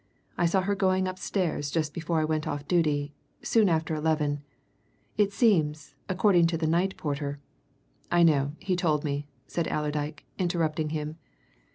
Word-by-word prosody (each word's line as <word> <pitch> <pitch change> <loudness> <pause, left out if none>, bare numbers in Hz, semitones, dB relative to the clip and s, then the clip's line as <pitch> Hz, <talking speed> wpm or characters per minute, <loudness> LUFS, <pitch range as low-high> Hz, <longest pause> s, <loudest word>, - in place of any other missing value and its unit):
I 175 - +2
saw 190 +3 +2
her 200 +2 0
going 190 -1 +2
upstairs 185 -5 -2
just 155 -1 -1
before 165 0 -1
I 155 - +2
went 155 -1 -1
off 145 0 -4
duty 150 -4 +1 0.3
soon 220 -4 +3
after 160 -1 0
eleven. 150 -2 0 0.7
It 205 -1 +2
seems, 155 - +2 0.2
according 185 -2 +4
to 165 0 -1
the 160 - -1
night 175 +4 +1
porter 145 -1 -3 0.4
" - - -37
"I 175 0 +5
know 145 -3 +3
he 190 -1 -1
told 155 -5 +1
me," 145 -1 -2 0.2
said 170 -2 -2
Allerdyke, 150 0 -2
interrupting 160 -4 0
him. 155 +1 -4
160 Hz, 160 wpm, -28 LUFS, 150-180 Hz, 0.7 s, I